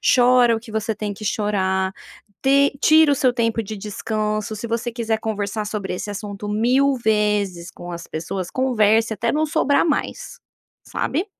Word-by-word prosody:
chora 245 -2 +5
o - - -3
que - - -9
você 220 +1 -2
tem 210 -1 -4
que 200 - -11
chorar, 190 -3 0 0.5
te 280 +1 +4
tira 315 -1 +6
o - - +3
seu 255 -2 +2
tempo 230 -1 0
de 215 +1 -6
descanso, 215 +1 -3
se 215 +3 -5
você 230 +1 -2
quiser 225 -2 -1
conversar 210 -1 -3
sobre 205 -3 -4
esse 205 - -5
assunto 205 0 -6
1000 250 +6 +3
vezes 210 -6 0
com 175 - -10
as 170 0 -7
pessoas, 175 +3 -5
converse 225 -3 +2
até 230 +2 -1
não 310 +1 +1
sobrar 295 -1 +2
mais, 410 +10 -3 0.5
sabe? 325 +8 -2
220 Hz, 170 wpm, -21 LUFS, 205-245 Hz, 0.5 s, tira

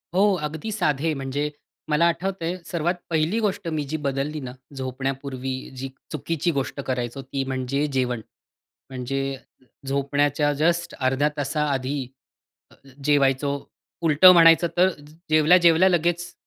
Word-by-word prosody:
हो, 190 - +4 0.2
अगदी 160 +8 -4
साधे, 160 -6 0
म्हणजे 135 +2 -2 0.4
मला 150 +2 +3
आठवतंय 175 0 -2
सर्वात 170 0 -1 0.2
पहिली 165 +6 +1
गोष्ट 205 -5 -1
मी 155 -2 -1
जी 155 - -1
बदलली 140 +3 -2
ना, 130 -3 -6 0.2
झोपण्यापूर्वी 130 0 -4 0.2
जी 135 +1 -4 0.2
चुकीची 155 +3 -1
गोष्ट 135 +1 -3
करायचो, 125 0 -3
ती 135 +1 -3
म्हणजे 130 +2 -1
जेवण. 125 -3 0 0.7
म्हणजे 135 +1 -3 0.5
झोपण्याच्या 145 +2 +1
जस्ट 170 +4 0
अर्ध्या 135 +3 +2
तासा 145 +2 -1
आधी 135 +1 -2 0.9
अ, - - -15 0.2
जेवायचो, 140 -1 +3 0.5
उलटं 165 +3 +7
म्हणायचं 165 0 +6
तर 185 +2 +5
ज 145 +1 -16 0.2
जेवल्या-जेवल्या 170 +3 +5
लगेच 175 0 0
145 Hz, 130 wpm, -24 LUFS, 135-165 Hz, 0.9 s, उलटं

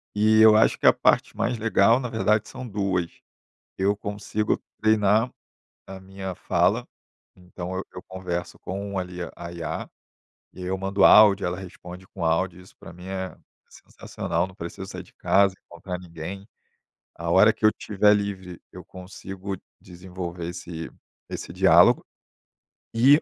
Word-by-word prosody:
e 110 +1 +4
eu 110 -1 +8
acho 110 - +3
que - - +2
a - - +8
parte - - +2
mais 125 - 0
legal, 115 +2 +3
na 125 - -4
verdade, 110 -1 +1
são 130 -1 -8
2. 95 -5 -1 0.7
Eu 100 +2 +2
consigo 105 +1 -2 0.2
treinar 110 +2 +3 0.6
a 95 0 -8
minha 95 -1 -7
fala, - - +1 0.5
então 90 0 -7
eu 95 - -3
eu 90 - -8
converso 90 -2 -5
com, 100 +1 -5
ali, 90 -1 -5 0.2
a 85 0 -8
IA. 85 -2 -5 0.7
E 90 - -9
eu 95 +1 -2
mando 95 0 +1
áudio, 105 -3 +7
ela 90 +1 -3
responde 90 0 -10
com 90 -3 -6
áudio, 85 +2 0
isso 90 - -18
pra 85 - -11
mim 90 +2 -12
é 95 -1 -5 0.3
sensacional, - - -4
não 95 - -14
preciso 95 +2 -7
sair - - -7
de - - -21
casa, 100 -1 +3
encontrar 90 +1 -7
ninguém. 90 +3 -8 0.7
A 85 0 -4
hora 105 +5 +6
que - - -2
eu 110 - +7
tiver 105 0 +2
livre, 95 -4 -3
eu - - -10
consigo 95 +1 -8 0.2
desenvolver 90 -1 -7
esse 85 -1 -7 0.4
esse - - -6
diálogo. - - +5 0.9
E, 135 +7 +6
95 Hz, 155 wpm, -25 LUFS, 90-105 Hz, 0.9 s, eu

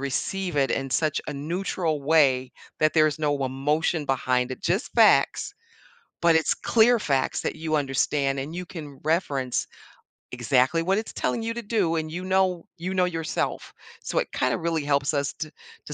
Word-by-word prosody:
receive 175 +6 -2
it 135 -1 +2
in 135 0 -2
such 155 +2 +1
a - - -2
neutral 160 +1 -2
way 135 -4 +3 0.3
that 155 0 +3
there's 155 -1 +3
no 145 -2 0
emotion 150 +5 0
behind 125 -1 0
it, 130 - -6
just 180 +6 -1
facts, - - +4 0.7
but 170 -1 +5
it's 160 - +2
clear 235 +1 +4
facts 135 -8 0
that - - -3
you 155 0 -3
understand, 140 0 0
and 140 +5 -5
you 180 +1 -4
can 150 -6 -9
reference 145 -6 0 0.7
exactly 125 +5 +2
what 190 +3 +1
it's 220 - -3
telling 230 - -1
you 230 0 -2
to 235 - -5
do, 205 -7 0
and 155 0 -3
you 180 +2 -5
know 185 -2 +1
you 180 +3 -4
know 185 -1 +3
yourself. 165 -3 -3 0.3
So - - -1
it - - -3
kind - - 0
of - - -3
really 165 -2 -1
helps 140 0 +1
us 140 -1 -1
to 155 -1 -5 0.3
to 150 - -7
155 Hz, 180 wpm, -25 LUFS, 140-175 Hz, 0.7 s, but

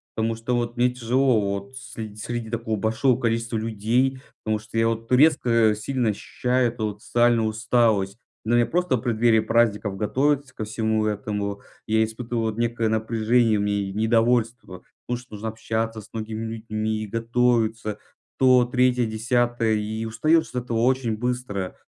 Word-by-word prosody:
Потому 115 +1 0
что 115 +2 -2
вот 120 0 -2
мне 125 0 +2
тяжело 125 0 +2
вот 100 +4 -3
среди 110 -5 -8
среди 115 +1 -5
такого 115 -1 -2
большого 115 +4 +1
количества 115 -1 -1
людей, 115 +5 0 0.2
потому 110 0 0
что 110 +1 -8
я 115 0 +3
вот 115 +1 -3
резко 120 -6 +4
сильно 120 +2 -1
ощущаю 125 +4 0
эту 115 -2 -4
вот 105 0 -7
социальную 120 -2 +2
усталость. 110 -3 +1 0.3
Но 120 +2 +3
я 120 - +4
просто 175 +3 0
в - - -7
преддверии 115 -1 +3
праздников, 110 -3 +1
готовиться 135 +5 0
ко 110 - -5
всему 110 0 0
этому, 105 -1 -3 0.3
я 110 0 +3
испытываю 115 +1 -3
вот 110 0 -4
некое 115 -1 0
напряжение 110 +1 +2
мне 105 0 0 0.2
и 95 - -7
недовольство: 115 -3 0 0.2
ну, 125 - -1
что 125 -2 -10
нужно 110 +2 -4
общаться 110 0 -3
с 105 - -17
многими 110 0 -4
людьми 110 -1 -3
и - - -6
готовиться, 115 -1 0 0.4
то, 130 -2 +5
3, 125 0 +2
10. 120 0 +1
И 110 +1 -3
устаешь 155 +9 +2
от 125 -1 -2
этого 115 -2 -1
очень 125 -3 +1
быстро. 125 -6 -3
115 Hz, 160 wpm, -24 LUFS, 110-120 Hz, 0.4 s, то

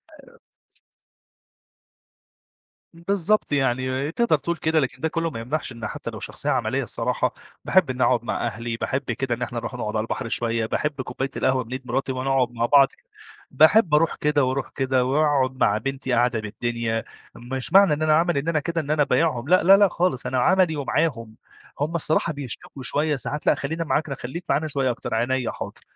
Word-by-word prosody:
آآ 475 -1 -18 2.6
بالضبط 195 +2 0
يعني، 130 +1 0
تقدر 235 -6 +2
تقول 170 +3 -3
كده 160 +1 +1
لكن 130 -1 -3
ده 160 - +1
كلّه 165 0 -1
ما 115 - -7
يمنعش 135 +4 -3
إنه 115 -2 -6
حتى - - -6
لو - - -8
شخصية - - -4
عملية - - 0
الصراحة، - - -1 0.3
باحب 185 -7 +3
إني 130 0 0
أقعد 120 -2 +2
مع 120 - -2
أهلي، 115 0 -4
باحب 130 +3 -2
كده 120 +1 -2
إن 125 - -14
إحنا 120 -1 -3
نروح 125 - -6
نقعد 110 -3 -4
على 110 - +1
البحر 115 - -4
شوية، 115 -1 0
باحب 145 +3 -2
كوباية 130 +2 -4
القهوة 130 -1 +1
من 115 - -15
إيد 130 -1 -6
مراتي 130 +2 -1
ونقعد 130 -1 0
مع 115 -1 -1
بعض. 140 +1 +6 0.6
باحب 160 +1 +5
أروح 160 +1 +2
كده 150 -2 +1
وأروح 130 +1 -1
كده 130 -1 +1
وأقعد 135 -2 +1
مع 105 0 +3
بنتي 135 0 -3
قعدة 120 -1 +2
بالدنيا، 115 +1 -3 0.3
مش 130 +6 -5
معنى 195 -5 +7
إن 150 - -3
أنا 155 -1 +4
عملي 170 -2 +2
إن 150 - -6
أنا 160 -2 +2
كده 165 +2 -2
إن 150 0 -4
أنا 150 -1 +3
بايعهم 130 -1 0
لأ 185 -2 +5
لأ 195 +2 +8
لأ، 200 -1 +6
خالص، 175 -7 -1
أنا 130 - 0
عملي 180 +2 +3
ومعاهم. 130 -6 -1 0.5
هُم 160 +3 -1
الصراحة 160 0 0
بيشتكوا 135 -1 -7
شوية 150 +2 0
ساعات 145 +3 -5
لأ، - - +6
خلّينا 160 +4 -3
معاك، 155 -1 -1
ن 135 - -3
خليك 160 +10 -7
معانا 150 +3 +1
شوية 135 -3 0
أكتر، 120 - -6
عينيا 125 +2 0
حاضر. - - -8
135 Hz, 190 wpm, -23 LUFS, 125-155 Hz, 2.6 s, لأ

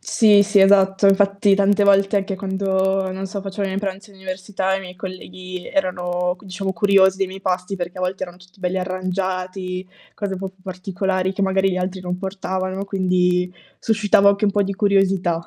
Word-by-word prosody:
Sì, 210 -2 +5
sì, 205 0 +3
esatto. 195 0 +5
Infatti 200 0 +4
tante 200 +1 +3
volte, 200 0 +4
anche 195 -1 -1
quando, 190 0 0
non 190 +1 -5
so, 200 0 -5
facevo 195 +1 -4
i - - 0
miei 190 +1 -2
pranzi 200 +1 -5
all'università, 190 0 -3
i 195 - -2
miei 180 -1 -10
colleghi 185 -1 -8
erano 180 -1 -1
c 210 - -19
diciamo 190 0 -4
curiosi 190 +1 +4
dei 195 - +1
miei 190 +1 -9
pasti, 185 +1 -2
perché 175 0 -5
a - - -4
volte 185 +1 -2
erano 175 -1 -6
tutti 185 +1 -21
belli 185 +1 -1
arrangiati, 185 0 -3 0.3
cose 200 -2 -4
un - - -7
po' 195 0 -4
più 190 0 -22
particolari 185 0 -2
che 200 - -1
magari 190 0 +2
gli 180 - -2
altri 185 +1 -3
non 180 0 -3
portavano, 190 0 -3
quindi 180 -2 +1 0.3
suscitava 210 -2 +4
anche 200 +1 0
un - - +3
po' 205 - +2
di 200 - -2
curiosità. 195 -4 +1
190 Hz, 195 wpm, -21 LUFS, 185-195 Hz, 0.3 s, Sì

